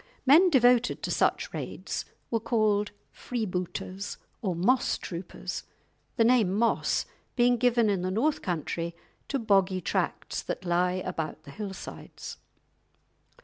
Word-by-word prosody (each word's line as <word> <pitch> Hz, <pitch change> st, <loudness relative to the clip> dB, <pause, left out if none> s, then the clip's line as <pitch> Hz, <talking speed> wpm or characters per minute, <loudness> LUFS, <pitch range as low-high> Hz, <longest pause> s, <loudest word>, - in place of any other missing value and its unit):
Men 320 Hz, +8 st, +7 dB
devoted 245 Hz, -4 st, +4 dB
to -, -, -1 dB
such -, -, +1 dB
raids -, -, -4 dB, 0.3 s
were 230 Hz, -, +2 dB
called 215 Hz, -3 st, +2 dB, 0.2 s
"Freebooters" 195 Hz, -3 st, -4 dB, 0.2 s
or 190 Hz, -6 st, -1 dB
"Mosstroopers," 185 Hz, -3 st, -1 dB, 0.5 s
the 230 Hz, -, +4 dB
name 230 Hz, -5 st, +4 dB
"Moss" 230 Hz, +2 st, +2 dB, 0.3 s
being 245 Hz, 0 st, +4 dB
given 240 Hz, -1 st, +3 dB
in 200 Hz, -3 st, +1 dB
the 185 Hz, -, -1 dB
North 255 Hz, +11 st, +1 dB
Country 170 Hz, 0 st, -2 dB, 0.3 s
to 275 Hz, -, 0 dB
boggy 195 Hz, -5 st, +3 dB
tracts 180 Hz, -, -1 dB
that 185 Hz, -, -5 dB
lie 180 Hz, +1 st, +2 dB
about 160 Hz, -4 st, -4 dB
the 140 Hz, -, -11 dB
hill 205 Hz, +4 st, -5 dB
sides. -, -, -8 dB
210 Hz, 125 wpm, -28 LUFS, 180-245 Hz, 0.5 s, Men